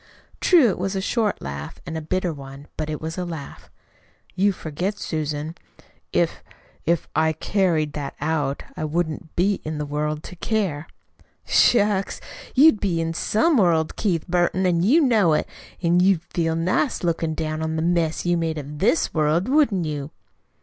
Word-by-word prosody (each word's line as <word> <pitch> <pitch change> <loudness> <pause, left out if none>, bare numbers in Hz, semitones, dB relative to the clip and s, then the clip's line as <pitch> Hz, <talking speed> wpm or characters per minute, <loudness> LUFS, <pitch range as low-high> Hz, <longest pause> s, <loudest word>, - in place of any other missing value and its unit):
True, 335 -9 +5
it 185 - -3
was 195 +2 -2
a - - 0
short 210 +1 -1
laugh, 70 +1 -6
and 165 - -5
a 160 - -3
bitter 180 +2 -1
one; 135 0 -10
but 155 -1 -3
it 150 - -3
was 160 +3 -5
a - - -1
laugh. 165 -5 -8 0.6
"You 195 +2 +3
forget, 180 +4 -4
Susan. 155 -3 -3 0.6
If - - 0 0.5
if 170 0 +1
I 160 0 +3
carried 160 -4 0
that 145 -2 -5
out 150 -2 -1
I - - -4
wouldn't 160 0 -2
be 195 +3 +1
in 155 0 -4
the 150 - -2
world 150 +1 -2
to 180 - -9
care." 175 -6 -1 0.6
"Shucks! 205 -4 +3 0.4
You'd 270 -4 +6
be 180 -5 0
in 165 0 -1
some 230 - +2
world, 165 -6 +2
Keith 175 -6 -1
Burton, 180 +1 +1
an' 170 -2 +2
you 260 - +5
know 220 - +4
it. - - +1 0.4
An' 170 +1 +3
you'd 180 -2 +3
feel 165 -2 0
nice 185 - 0
lookin' 165 -2 0
down 155 0 -3
on 160 0 -2
the 160 - -1
mess 170 -2 0
you'd 175 0 +2
made 160 -1 -1
of 145 0 -7
THIS 235 - +2
world, 155 +5 +2
wouldn't 260 - +3
you?" 145 -2 -4
165 Hz, 175 wpm, -23 LUFS, 155-190 Hz, 0.6 s, You'd